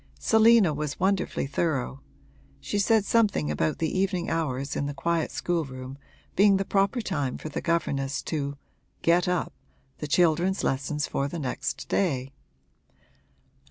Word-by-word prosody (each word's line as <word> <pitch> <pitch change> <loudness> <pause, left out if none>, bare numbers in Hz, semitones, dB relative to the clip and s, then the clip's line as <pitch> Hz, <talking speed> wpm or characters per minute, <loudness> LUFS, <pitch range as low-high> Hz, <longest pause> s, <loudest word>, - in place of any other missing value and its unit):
Selina 220 -6 +5
was 150 0 -4
wonderfully 190 -4 0
thorough; 140 -2 -2 0.6
she 205 - -2
said 215 0 +3
something 205 - +2
about 80 +1 0
the 160 - -1
evening 185 -3 0
hours 140 -4 -2
in 140 - -1
the 145 - -5
quiet 165 +3 0
schoolroom 135 -6 -3 0.4
being 200 0 +5
the 195 - -1
proper 200 +5 +1
time 145 - -2
for 155 - -7
the 145 - -4
governess 140 -5 -1
to 140 -3 -3 0.5
'get 170 +1 +3
up' 180 -1 -1 0.5
the 150 - -4
children's 175 +4 +2
lessons 140 +2 -1
for 140 - -1
the 155 - -5
next 135 -5 -3
day. 135 -8 0
160 Hz, 140 wpm, -27 LUFS, 140-190 Hz, 0.6 s, Selina